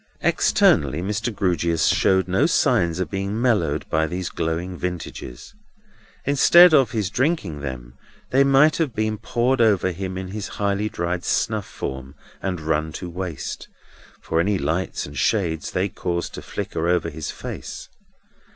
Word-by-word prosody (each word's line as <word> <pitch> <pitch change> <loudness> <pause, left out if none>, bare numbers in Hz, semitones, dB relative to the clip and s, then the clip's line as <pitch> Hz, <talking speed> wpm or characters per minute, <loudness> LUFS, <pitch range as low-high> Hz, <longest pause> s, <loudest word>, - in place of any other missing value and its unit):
Externally, 70 +2 +3
Mr. 105 +5 -2
Grewgious 85 -5 0
showed 95 -1 +3
no 95 +1 +2
signs 85 0 +2
of 90 -4 -2
being 100 +2 -2
mellowed 100 - +1
by 80 0 +1
these 90 +2 -4
glowing 85 +2 -3
vintages. 90 - -6 0.7
Instead 170 +5 +7
of 135 -6 +5
his 105 -4 -2
drinking 125 - 0
them, 65 -3 -6 0.4
they 135 +2 +5
might 140 +3 +5
have 155 -7 -1
been 110 -1 -1
poured 120 +2 +1
over 100 -5 +3
him 95 +1 -5
in 95 0 -5
his 100 +1 -5
high 100 +1 0
dried 85 -2 -3
snuff 110 0 0
form, 65 +1 -6 0.3
and 95 -3 -2
run 80 0 -1
to 90 -2 -6
waste, 90 -4 -5 0.5
for 80 - -1
any 100 +4 +2
lights 90 +2 -2
and 70 -2 -7
shades 85 -7 0
they 95 +2 0
caused 85 -2 -3
to - - -7
flicker 80 - -4
over 85 -1 +1
his 80 0 -6
face. - - -7
95 Hz, 150 wpm, -23 LUFS, 80-110 Hz, 0.7 s, Instead